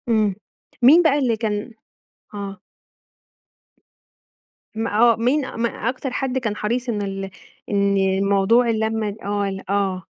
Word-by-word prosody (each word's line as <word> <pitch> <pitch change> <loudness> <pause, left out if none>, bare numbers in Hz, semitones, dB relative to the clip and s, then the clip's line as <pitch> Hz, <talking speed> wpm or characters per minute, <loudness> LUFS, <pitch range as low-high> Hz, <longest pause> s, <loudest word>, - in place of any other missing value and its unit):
امم 215 -4 +2 0.5
مين 290 +8 +7
بقى 295 -3 +3
اللي 240 -5 +1
كان 215 +1 -3 0.6
آه، 200 -2 -6 2.2
ما 220 -1 -1
آه 235 0 +6
مين 260 +5 0
ما 235 0 0 0.2
أكتر 255 +1 -4
حد 260 0 -2
كان 225 -5 -2
حريص 240 +4 -2
إن 210 -3 -1
ال 195 -1 -4 0.4
إن 200 -1 +2 0.3
موضوع 200 +5 +3
اللمة 220 -2 -1
آه 205 0 -1
ال 195 -1 -6
آه. 195 -2 0
220 Hz, 130 wpm, -21 LUFS, 200-240 Hz, 2.2 s, مين